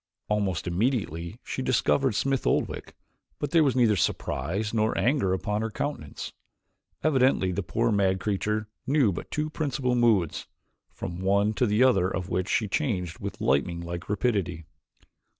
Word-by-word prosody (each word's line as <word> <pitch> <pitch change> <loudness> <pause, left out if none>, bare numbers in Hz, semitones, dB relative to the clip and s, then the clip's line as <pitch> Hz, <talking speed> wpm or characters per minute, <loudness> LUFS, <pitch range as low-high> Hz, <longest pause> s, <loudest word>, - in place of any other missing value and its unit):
Almost 100 -5 0
immediately 90 - -1
she - - -4
discovered 130 -1 +2
Smith 135 +3 0
Oldwick - - -1 0.4
but 145 - -3
there 165 -2 +5
was 135 -4 +2
neither 115 -4 +4
surprise 100 +3 -1
nor 110 -1 +1
anger 120 -3 +2
upon 105 +3 -1
her 110 - -1
countenance. 125 - -5 0.7
Evidently 130 -10 +3
the 90 - -1
poor - - 0
mad 95 -2 +2
creature 105 +2 -1 0.2
knew 135 -6 +3
but 85 - -6
two 155 0 -2
principal 135 -5 -1
moods, 115 -9 +2 0.4
from 85 +1 -6
one 100 +2 +2
to 125 +3 +1
the 105 +4 +3
other 95 -8 +4
of 95 -1 -4
which 95 +1 -1
she 110 - +1
changed 95 - -2
with - - -6
lightning 75 +6 +1
like 85 +2 -6
rapidity. 100 -7 -1
105 Hz, 150 wpm, -27 LUFS, 95-130 Hz, 0.7 s, there